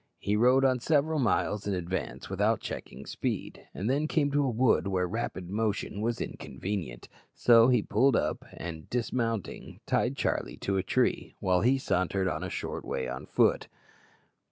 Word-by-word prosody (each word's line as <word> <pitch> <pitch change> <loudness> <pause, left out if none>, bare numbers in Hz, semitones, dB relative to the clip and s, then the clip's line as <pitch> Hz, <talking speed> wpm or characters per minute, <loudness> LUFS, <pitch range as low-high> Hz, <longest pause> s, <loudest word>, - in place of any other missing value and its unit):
He 100 - -1
rode 125 +5 +4
on 130 -1 +3
several 155 +4 +1
miles 105 -4 0
in 100 - 0
advance 90 +1 -4
without - - +1
checking 65 +3 -7
speed, - - -4
and 100 - -4
then 145 +5 +1
came 145 -3 +1
to 145 0 +2
a 135 - +1
wood 120 -3 +2
where 95 -2 +1
rapid 110 -3 -4
motion 105 -1 -1
was 115 +1 -1
inconvenient; 85 -3 -5 0.3
so 115 -1 +6
he 125 -5 +3
pulled 125 +4 +3
up, - - 0
and, 80 -2 -7
dismounting, 115 -3 -3
tied - - 0
Charlie - - -1
to 95 0 -1
a - - +2
tree, 95 - 0
while 90 -1 +2
he 130 +4 +4
sauntered 95 -5 0
on - - -2
a - - -3
short - - -4
way 65 - -3
on 65 +1 -6
foot. - - +2
110 Hz, 170 wpm, -29 LUFS, 95-125 Hz, 0.3 s, so